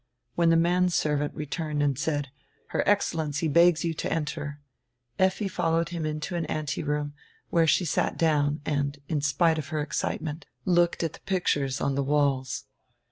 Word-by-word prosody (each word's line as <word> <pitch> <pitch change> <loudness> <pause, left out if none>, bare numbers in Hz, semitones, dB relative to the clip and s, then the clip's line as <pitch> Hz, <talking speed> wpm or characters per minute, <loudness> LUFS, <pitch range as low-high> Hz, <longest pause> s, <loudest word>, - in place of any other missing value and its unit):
When 170 -1 +3
the 165 - +5
man 175 +2 +3
servant 150 -3 0
returned 150 0 -2
and 140 -2 +2
said, 145 -1 -1 0.4
"Her - - 0
Excellency 160 -6 +1
begs 170 +2 +4
you 165 - 0
to - - -3
enter," 150 -2 -3 0.6
Effi 190 +2 +2
followed 165 -3 0
him 165 -3 -3
into 155 +3 -3
an 170 -1 -2
anteroom, 150 -1 -2 0.4
where 165 -1 +4
she 180 - +3
sat 155 - 0
down 150 -2 +2
and, 140 -1 -1
in 155 -4 -1
spite 160 +3 +2
of 145 - -5
her 155 - -2
excitement, 150 +1 -3 0.2
looked 175 -2 +2
at 165 - -1
the - - -12
pictures 145 -8 0
on 140 - 0
the 140 - 0
walls. 135 -3 0
155 Hz, 165 wpm, -27 LUFS, 145-170 Hz, 0.6 s, the